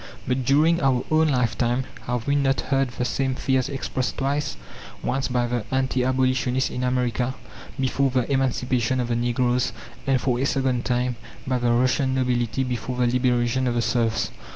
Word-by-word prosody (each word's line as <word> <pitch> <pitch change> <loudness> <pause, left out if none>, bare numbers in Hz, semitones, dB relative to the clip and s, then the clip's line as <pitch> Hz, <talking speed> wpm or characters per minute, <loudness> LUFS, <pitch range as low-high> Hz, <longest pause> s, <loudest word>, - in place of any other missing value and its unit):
But 130 +1 0
during 155 +6 +3
our 130 -2 +2
own 160 0 +4
lifetime, 125 -1 +1 0.2
have 120 -1 -2
we 140 - +1
not 135 -1 +2
heard 135 0 +1
the 125 +1 -3
same 130 0 -1
fears 130 -1 0
expressed 130 -2 -3
twice? 140 - -1 0.5
Once, 135 0 0
by 125 -1 0
the 120 -2 -2
anti 130 -1 0
abolitionists 130 0 +1
in 125 - -3
America 125 0 0 0.4
before 135 +1 +1
the 125 +1 0
emancipation 130 -2 +1
of 120 -1 -1
the 120 - +1
Negroes, 120 +1 +1 0.3
and, 135 -1 +3
for 125 -1 0
a 135 - +1
second 130 -3 0
time, 125 -1 0 0.3
by 130 -1 0
the 120 -1 +1
Russian 130 +2 +2
nobility 125 -1 0
before 125 0 -3
the 125 - +2
liberation 125 0 +1
of 120 - 0
the 120 - +2
serfs? 115 -2 0
125 Hz, 175 wpm, -24 LUFS, 120-130 Hz, 0.5 s, own